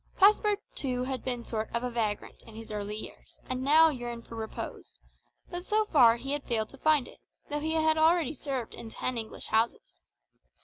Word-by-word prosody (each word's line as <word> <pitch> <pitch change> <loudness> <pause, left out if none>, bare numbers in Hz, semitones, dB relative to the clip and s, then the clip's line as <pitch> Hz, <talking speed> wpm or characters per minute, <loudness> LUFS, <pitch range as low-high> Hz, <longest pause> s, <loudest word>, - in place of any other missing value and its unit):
Passepartout 395 - +2
had 260 -1 -3
been 245 -2 -2
a - - -14
sort 220 -1 -3
of 245 +1 -1
vagrant 215 -3 -2
in 225 - -12
his 225 0 -9
early 210 0 -3
years, - - -11
and 255 0 -2
now 310 +4 +6
yearned 240 -4 -5
for - - -12
repose; 220 -1 -7 0.5
but 350 0 -4
so 430 +2 +1
far 245 - +6
he 270 +3 -5
had 290 -1 -2
failed 220 -2 -1
to 275 - -14
find 305 -4 +3
it, - - -15 0.3
though 295 - 0
he 315 +2 -1
had 315 0 +3
already 320 -2 +4
served 265 -4 -4
in 225 - -8
ten 255 +3 -3
English 225 -2 -5
houses. - - 0
255 Hz, 190 wpm, -29 LUFS, 225-310 Hz, 0.5 s, now